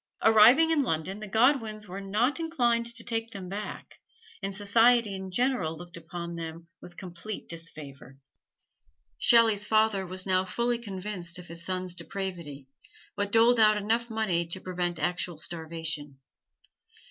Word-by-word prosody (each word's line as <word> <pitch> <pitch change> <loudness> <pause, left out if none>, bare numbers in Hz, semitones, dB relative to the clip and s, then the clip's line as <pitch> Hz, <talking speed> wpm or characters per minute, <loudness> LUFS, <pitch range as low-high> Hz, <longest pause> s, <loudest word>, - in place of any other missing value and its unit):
Arriving 230 +9 +7
in 315 -3 +3
London 190 - -2
the 215 - -7
Godwins 220 -1 +1
were 190 +2 -6
not 220 +10 0
inclined 240 -8 +1
to 235 -1 -3
take 225 -1 -2
them 195 -4 -7
back, 205 +3 -7 0.4
and 195 -1 -4
society 225 +2 +4
in 190 0 -6
general 185 -7 0
looked 175 0 -11
upon 170 +1 -7
them 165 0 -7
with 175 - -13
complete 185 +3 -7
disfavor. 145 -5 -8 1.0
Shelley's 225 -3 +5
father 215 -3 +2
was 185 +1 -4
now 185 -1 +2
fully 235 +5 -1
convinced 190 -5 -5
of 180 - -10
his 170 0 -5
son's 185 0 -3
depravity, 170 -6 -6 0.5
but 205 0 -2
doled 230 +2 +5
out 215 -1 +6
enough 225 +3 0
money 190 -7 0
to 170 +3 -3
prevent 180 -2 -3
actual 175 +1 -2
starvation. 160 -3 -3
195 Hz, 145 wpm, -28 LUFS, 170-225 Hz, 1.0 s, Arriving